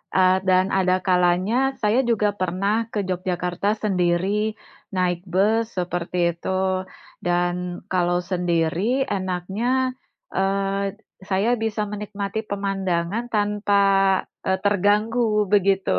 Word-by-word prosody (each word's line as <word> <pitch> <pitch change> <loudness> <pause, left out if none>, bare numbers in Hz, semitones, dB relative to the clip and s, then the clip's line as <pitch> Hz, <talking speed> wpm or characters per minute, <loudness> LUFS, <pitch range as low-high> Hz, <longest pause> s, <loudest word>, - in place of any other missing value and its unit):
eee, 185 0 +5
dan 185 0 +4
ada 185 -1 +3
kalanya 180 +4 +2 0.3
saya 215 +4 +3
juga 210 -2 +2
pernah 185 +3 0 0.2
ke 210 - -2
Jogyakarta 180 0 -2 0.2
sendiri, 180 -2 +1 0.7
naik 180 -1 +1
bus 215 +5 +3
seperti 175 0 -3 0.2
itu. 170 - -9 0.8
Dan 175 0 +1 0.4
kalau 175 -1 +2
sendiri 170 -1 0 0.3
enaknya, 190 +3 -2 0.7
eee, 195 +1 0 0.5
saya 195 +4 +2
bisa 215 -1 -1
menikmati 205 0 -4
pemandangan 195 0 -1
tanpa, 205 -1 +2 0.6
eee, 190 0 +2
terganggu 205 +4 +2 0.3
begitu. 195 -1 +3
190 Hz, 100 wpm, -23 LUFS, 180-205 Hz, 0.8 s, eee